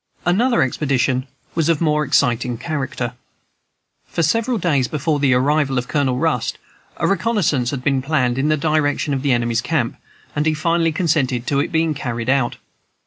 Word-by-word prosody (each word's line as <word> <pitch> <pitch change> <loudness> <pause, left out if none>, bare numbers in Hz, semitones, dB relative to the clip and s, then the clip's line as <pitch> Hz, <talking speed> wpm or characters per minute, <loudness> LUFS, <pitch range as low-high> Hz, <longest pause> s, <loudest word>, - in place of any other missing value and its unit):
Another 230 - +3
expedition 130 -1 0 0.3
was 165 -1 0
of 165 -3 +2
more 150 -2 +2
exciting 125 -3 +1
character. 130 -5 -3 0.9
For 170 - -1
several 230 +9 +1
days 145 - +1
before 150 +1 -1
the 135 -3 +3
arrival 140 +1 +1
of 125 0 -2
Colonel 135 -4 0
Rust 150 -5 0 0.4
a - - -1
reconnaissance 185 - +1
had 130 -2 -4
been 135 -1 +1
planned 130 -3 0
in 145 +3 +1
the 155 - +2
direction 150 -1 0
of 135 - -1
the 140 -1 +1
enemy's 120 -1 +1
camp, 125 -2 -1 0.4
and 150 +1 +1
he 155 - +2
finally 165 +1 +1
consented 145 -7 0
to 140 +1 +1
its - - -1
being 160 -1 +1
carried 120 -3 -2
out. 135 -3 +1
145 Hz, 170 wpm, -20 LUFS, 130-160 Hz, 0.9 s, Another